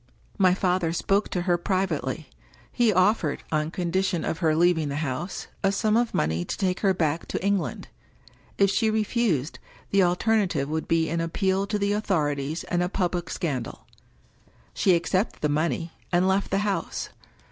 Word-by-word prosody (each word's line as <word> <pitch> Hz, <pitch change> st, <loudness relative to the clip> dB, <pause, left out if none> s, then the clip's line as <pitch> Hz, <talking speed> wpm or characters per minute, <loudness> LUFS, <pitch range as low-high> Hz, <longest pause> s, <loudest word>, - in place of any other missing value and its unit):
My 185 Hz, -2 st, +5 dB
father 180 Hz, -3 st, +1 dB
spoke 195 Hz, +4 st, +1 dB
to 180 Hz, -, -2 dB
her 175 Hz, -1 st, +1 dB
privately: 160 Hz, -7 st, -1 dB, 0.4 s
he 235 Hz, -3 st, +3 dB
offered 185 Hz, -5 st, +2 dB
— -, -, -24 dB
on 155 Hz, 0 st, 0 dB
condition 180 Hz, 0 st, -1 dB
of 165 Hz, -, -2 dB
her 160 Hz, -3 st, +2 dB
leaving 165 Hz, -2 st, +3 dB
the 140 Hz, -, -3 dB
house 145 Hz, +8 st, -4 dB
— -, -, -33 dB
a 195 Hz, -, +3 dB
sum 210 Hz, +2 st, +1 dB
of 235 Hz, 0 st, +2 dB
money 80 Hz, +3 st, 0 dB
to -, -, -5 dB
take 185 Hz, -2 st, 0 dB
her 195 Hz, -, +3 dB
back 165 Hz, -3 st, -1 dB
to -, -, -3 dB
England. 200 Hz, -2 st, -1 dB, 0.7 s
If 200 Hz, -1 st, +4 dB
she 220 Hz, +2 st, +2 dB
refused, 215 Hz, -, 0 dB, 0.3 s
the 200 Hz, -, +4 dB
alternative 180 Hz, -4 st, +1 dB
would 160 Hz, +1 st, -2 dB
be 165 Hz, -1 st, +2 dB
an 165 Hz, +1 st, -1 dB
appeal 190 Hz, +3 st, 0 dB
to 210 Hz, 0 st, -1 dB
the 200 Hz, 0 st, 0 dB
authorities 155 Hz, -7 st, -1 dB
and 175 Hz, -1 st, -1 dB
a 180 Hz, -, 0 dB
public 180 Hz, -3 st, -1 dB
scandal. 130 Hz, -, -4 dB, 0.9 s
She 185 Hz, -3 st, +3 dB
accepted 180 Hz, +5 st, -1 dB
the 150 Hz, -, +2 dB
money, 165 Hz, +2 st, -1 dB, 0.2 s
and 180 Hz, +1 st, +3 dB
left 190 Hz, +1 st, +1 dB
the -, -, +1 dB
house. 200 Hz, -2 st, -2 dB
180 Hz, 175 wpm, -25 LUFS, 160-195 Hz, 0.9 s, My